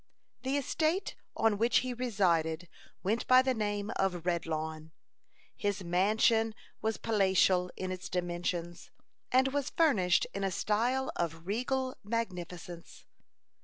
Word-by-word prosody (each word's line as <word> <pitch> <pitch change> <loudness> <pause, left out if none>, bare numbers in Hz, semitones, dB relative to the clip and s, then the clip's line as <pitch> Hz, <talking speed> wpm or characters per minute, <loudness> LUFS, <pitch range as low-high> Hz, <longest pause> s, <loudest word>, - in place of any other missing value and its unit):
The 265 +2 0
estate 315 +6 0 0.2
on 220 -2 +2
which 230 +2 +4
he 255 -1 -3
resided 180 -9 +1 0.4
went 215 +5 0
by 255 0 +7
the 260 0 +1
name 205 -2 -2
of 180 -3 0
Redlawn. 160 -2 -2 0.6
His 205 -1 -2
mansion 215 +5 +2 0.3
was 220 0 0
palatial 190 -4 +3
in 185 0 -3
its 185 0 -6
dimensions, 175 -1 -3 0.4
and 260 +1 +4
was 280 0 -1
furnished 200 - +3
in 200 - -3
a 195 - +1
style 240 +8 0
of 165 -1 -3
regal 255 +5 -1
magnificence. 180 -6 -5
200 Hz, 125 wpm, -31 LUFS, 175-235 Hz, 0.6 s, by